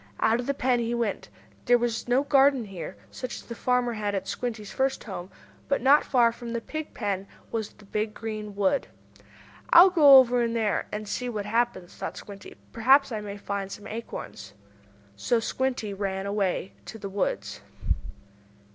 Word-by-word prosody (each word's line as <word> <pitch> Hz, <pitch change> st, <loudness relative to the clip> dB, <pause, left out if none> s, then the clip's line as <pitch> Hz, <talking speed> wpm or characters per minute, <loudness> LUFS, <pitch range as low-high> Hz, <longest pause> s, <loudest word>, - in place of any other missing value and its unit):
Out 225 Hz, +2 st, +3 dB
of 245 Hz, -, -4 dB
the 280 Hz, -, 0 dB
pen 250 Hz, -2 st, +1 dB
he 235 Hz, 0 st, -1 dB
went. 230 Hz, -4 st, -2 dB, 0.4 s
There 245 Hz, -, +5 dB
was 235 Hz, -1 st, -2 dB
no 250 Hz, +3 st, +3 dB
garden 275 Hz, -3 st, +4 dB
here, 175 Hz, -, -8 dB
such 255 Hz, -, -6 dB
as -, -, -8 dB
the 235 Hz, -, -8 dB
farmer 250 Hz, 0 st, +1 dB
had 205 Hz, -2 st, -2 dB
at 195 Hz, 0 st, -3 dB
Squinty's 220 Hz, -5 st, -4 dB
first 265 Hz, 0 st, 0 dB
home. 190 Hz, -4 st, -7 dB, 0.4 s
But, 280 Hz, -, +1 dB
not 275 Hz, +4 st, +5 dB
far 240 Hz, -3 st, +3 dB
from 235 Hz, 0 st, -7 dB
the 235 Hz, -, -1 dB
pig 310 Hz, +6 st, -7 dB
pen 200 Hz, -3 st, -2 dB, 0.2 s
was 220 Hz, -2 st, -2 dB
the 210 Hz, -, -18 dB
big, 210 Hz, +2 st, -2 dB
green 215 Hz, -2 st, -6 dB
wood. 200 Hz, +7 st, +1 dB, 0.8 s
"I'll 365 Hz, +2 st, +9 dB
go 290 Hz, -6 st, +9 dB
over 245 Hz, -1 st, +5 dB
in 230 Hz, -1 st, 0 dB
there 220 Hz, -3 st, 0 dB
and 210 Hz, 0 st, -5 dB
see 250 Hz, +4 st, -3 dB
what 210 Hz, -4 st, -4 dB
happens," 225 Hz, -5 st, -1 dB
thought -, -, -6 dB
Squinty. 200 Hz, -1 st, -10 dB, 0.2 s
"Perhaps 265 Hz, +4 st, +4 dB
I 215 Hz, -2 st, -3 dB
may 205 Hz, -1 st, -6 dB
find 200 Hz, -1 st, -4 dB
some 205 Hz, -, -8 dB
acorns." 210 Hz, -, -7 dB
And 100 Hz, 0 st, -29 dB, 0.3 s
so 240 Hz, -, +2 dB
Squinty 245 Hz, -3 st, -2 dB
ran 195 Hz, -1 st, -3 dB
away 200 Hz, -2 st, -1 dB
to 225 Hz, -, -8 dB
the 200 Hz, -, -6 dB
woods. 195 Hz, 0 st, -3 dB
225 Hz, 180 wpm, -27 LUFS, 200-245 Hz, 0.8 s, I'll